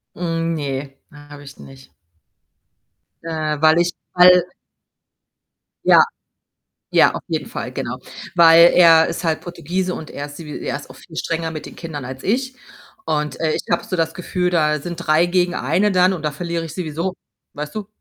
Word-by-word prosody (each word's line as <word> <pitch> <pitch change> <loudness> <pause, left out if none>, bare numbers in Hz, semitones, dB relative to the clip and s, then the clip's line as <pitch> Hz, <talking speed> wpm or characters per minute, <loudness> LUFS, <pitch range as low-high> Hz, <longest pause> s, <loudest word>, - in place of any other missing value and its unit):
Hm, 165 -1 -2
ne, 135 -1 -4 0.2
habe 145 0 -13
ich 140 0 -13
nicht. 135 0 -14 1.3
Äh, 155 -2 -3
weil 160 +1 +5
ich 175 0 +1 0.2
hal 180 0 +7 1.4
Ja. - - +7 0.9
Ja, - - +5
auf - - -5
jeden - - -2
Fall, - - -5
genau. - - -4 0.4
Weil 170 0 +7
er 165 -2 +7
ist - - -4
halt 160 -2 -1
Portugiese 180 +1 -3
und 160 - -8
er 145 +1 -6
ist 145 +2 -11
wie 150 -2 -7
er - - -3
ist 140 - -11
auch - - -12
viel 165 - -16
strenger 165 0 -3
mit 155 - -7
den - - -12
Kindern 150 -5 -7
als 130 +1 -8
ich. 255 +4 -1 0.5
Und, 150 -3 -2
äh, 160 -1 +1
ich - - -2
habe 170 - +1
so - - -5
das 165 -2 0
Gefühl, 180 0 -2
da 150 -3 +1
sind 175 +3 -6
3 165 0 +2
gegen 180 0 +1
eine 180 +10 +1
dann 185 +1 +4
und 175 - -5
da 150 - -1
verliere 170 0 -4
ich 160 -1 -8
sowieso, 170 +1 -3 0.4
weißt 150 +1 -6
du? 210 - -4
165 Hz, 180 wpm, -20 LUFS, 150-175 Hz, 1.4 s, hal